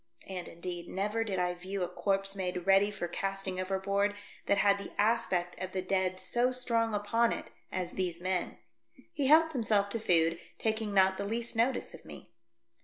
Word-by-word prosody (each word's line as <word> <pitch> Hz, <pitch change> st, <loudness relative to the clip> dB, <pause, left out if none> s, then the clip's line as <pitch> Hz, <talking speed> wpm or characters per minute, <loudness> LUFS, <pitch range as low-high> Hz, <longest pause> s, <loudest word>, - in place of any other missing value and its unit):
And, 185 Hz, -2 st, -5 dB
indeed, 175 Hz, 0 st, -6 dB
never 210 Hz, +4 st, -1 dB
did 200 Hz, -4 st, -2 dB
I 180 Hz, 0 st, +1 dB
view 185 Hz, +2 st, -4 dB
a -, -, 0 dB
corpse 195 Hz, +1 st, 0 dB
made 180 Hz, -2 st, -3 dB
ready 195 Hz, +1 st, +5 dB
for 200 Hz, -4 st, -4 dB
casting 195 Hz, +1 st, -3 dB
overboard 200 Hz, +2 st, 0 dB, 0.3 s
that 200 Hz, -, +3 dB
had 200 Hz, 0 st, +4 dB
the 200 Hz, -, -9 dB
aspect 205 Hz, -5 st, +1 dB
of 185 Hz, 0 st, -4 dB
the 190 Hz, -, -1 dB
dead 185 Hz, -1 st, 0 dB
so 245 Hz, +5 st, +1 dB
strong 230 Hz, -3 st, 0 dB
upon 230 Hz, +3 st, +2 dB
it -, -, -5 dB, 0.2 s
as 180 Hz, -2 st, -2 dB
these 180 Hz, -3 st, -2 dB
men. 185 Hz, 0 st, -2 dB, 0.6 s
He 275 Hz, -, 0 dB
helped 320 Hz, +2 st, +6 dB
himself 215 Hz, -5 st, +2 dB
to 230 Hz, -, -1 dB
food, 165 Hz, -4 st, +2 dB, 0.2 s
taking; 220 Hz, -1 st, -1 dB
not 190 Hz, 0 st, +5 dB
the -, -, -1 dB
least 230 Hz, +3 st, -2 dB
notice 240 Hz, +3 st, +1 dB
of -, -, -11 dB
me. -, -, -12 dB
195 Hz, 180 wpm, -31 LUFS, 185-220 Hz, 0.6 s, helped